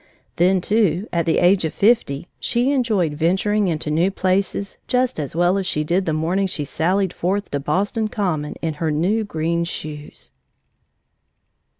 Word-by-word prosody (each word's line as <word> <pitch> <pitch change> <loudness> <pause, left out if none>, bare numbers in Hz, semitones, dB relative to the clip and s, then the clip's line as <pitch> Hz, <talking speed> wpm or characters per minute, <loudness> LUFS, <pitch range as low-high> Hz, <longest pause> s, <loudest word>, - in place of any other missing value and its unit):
Then, 185 +2 +3
too, 200 -1 +1
at 170 -1 0
the 165 - +2
age 180 +1 +4
of 160 - -3
fifty, 200 - +2
she 245 +3 +1
enjoyed 215 - +1
venturing 190 +6 +1
into 155 -3 -2
new 165 +5 +2
places 195 +1 -1
just 250 -6 0
as 145 0 -4
well 175 +3 +2
as 190 - -3
she 150 -3 0
did 175 +4 0
the - - +2
morning 170 +5 0
she 150 -5 -2
sallied 180 +5 0
forth 195 +3 -2
to 140 - -1
Boston 200 - -1
Common 175 -9 -2
in 160 -1 -1
her 160 - +1
new 180 +9 +1
green 170 -3 -1
shoes! 150 -3 -7
180 Hz, 165 wpm, -21 LUFS, 160-200 Hz, -, age